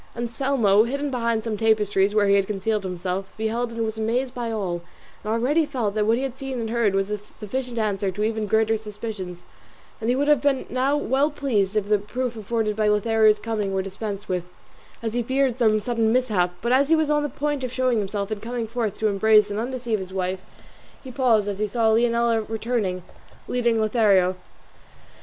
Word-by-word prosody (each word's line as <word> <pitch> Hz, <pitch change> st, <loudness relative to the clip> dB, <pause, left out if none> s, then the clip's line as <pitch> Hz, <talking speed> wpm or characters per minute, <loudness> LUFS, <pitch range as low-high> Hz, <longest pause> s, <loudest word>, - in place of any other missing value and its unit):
Anselmo, 235 Hz, -3 st, +2 dB
concealed 280 Hz, +4 st, -2 dB
behind 230 Hz, -3 st, 0 dB
some 220 Hz, -2 st, -3 dB
tapestries 210 Hz, -2 st, +2 dB
where 210 Hz, -1 st, +4 dB
he 200 Hz, -, +4 dB
had 200 Hz, -1 st, +3 dB
hidden 210 Hz, +1 st, -1 dB
himself, 185 Hz, +1 st, -4 dB
beheld 230 Hz, +2 st, -1 dB
and 230 Hz, 0 st, -2 dB
was 220 Hz, 0 st, -4 dB
amazed 245 Hz, +4 st, -1 dB
at 235 Hz, -2 st, -3 dB
all, 185 Hz, -6 st, -2 dB, 0.4 s
and 215 Hz, -, -3 dB
already 260 Hz, +8 st, +2 dB
felt 250 Hz, -9 st, -2 dB
that 210 Hz, 0 st, 0 dB
what 225 Hz, +1 st, +3 dB
he 260 Hz, -, -2 dB
had 265 Hz, -2 st, -3 dB
seen 265 Hz, -2 st, -5 dB
and 225 Hz, -1 st, -3 dB
heard 230 Hz, -4 st, +2 dB
was 195 Hz, +1 st, 0 dB
a 210 Hz, -, -2 dB
sufficient 235 Hz, +4 st, -6 dB
answer 205 Hz, -3 st, 0 dB
to 205 Hz, +3 st, -3 dB
even 220 Hz, -1 st, -1 dB
greater 220 Hz, +1 st, +2 dB
suspicions; 210 Hz, -4 st, -7 dB, 0.6 s
and 225 Hz, -, -2 dB
he 245 Hz, -, +3 dB
would 285 Hz, +2 st, 0 dB
have 295 Hz, -4 st, +4 dB
been 280 Hz, -2 st, +1 dB
now 265 Hz, +3 st, +1 dB
well 280 Hz, +1 st, +1 dB
pleased 225 Hz, -10 st, 0 dB
if 210 Hz, -2 st, 0 dB
the 210 Hz, 0 st, +3 dB
proof 240 Hz, +4 st, -3 dB
afforded 220 Hz, 0 st, -1 dB
by 215 Hz, 0 st, +1 dB
Lothario's 215 Hz, +1 st, +4 dB
coming 210 Hz, -3 st, -2 dB
were 190 Hz, -, 0 dB
dispensed 200 Hz, +1 st, -6 dB
with, 180 Hz, -2 st, -2 dB, 0.6 s
as 225 Hz, -1 st, -2 dB
he 240 Hz, -, 0 dB
feared 260 Hz, +1 st, +1 dB
some 215 Hz, -3 st, +4 dB
sudden 225 Hz, 0 st, 0 dB
mishap; 210 Hz, -8 st, +1 dB
but 235 Hz, -, -1 dB
as 275 Hz, +3 st, +3 dB
he 325 Hz, -, +6 dB
was 315 Hz, -2 st, +1 dB
on 295 Hz, 0 st, +3 dB
the 295 Hz, -, -2 dB
point 290 Hz, -1 st, -2 dB
of 255 Hz, -, -3 dB
showing 255 Hz, -3 st, +1 dB
himself 200 Hz, 0 st, -3 dB
and 210 Hz, -2 st, -3 dB
coming 235 Hz, +1 st, -3 dB
forth 225 Hz, -2 st, -3 dB
to 220 Hz, -, +1 dB
embrace 210 Hz, +1 st, +4 dB
and 205 Hz, -, -2 dB
undeceive 240 Hz, -2 st, -2 dB
his 190 Hz, -1 st, -7 dB
wife 185 Hz, 0 st, -2 dB, 0.6 s
he 260 Hz, -, -8 dB
paused 235 Hz, -5 st, +2 dB
as 200 Hz, -1 st, -3 dB
he 215 Hz, -, 0 dB
saw 225 Hz, +1 st, +2 dB
Leonela 235 Hz, 0 st, +2 dB
returning, 220 Hz, -5 st, -2 dB, 0.4 s
leading 235 Hz, -2 st, +1 dB
Lothario. 205 Hz, -5 st, +3 dB
220 Hz, 205 wpm, -24 LUFS, 205-245 Hz, 0.6 s, he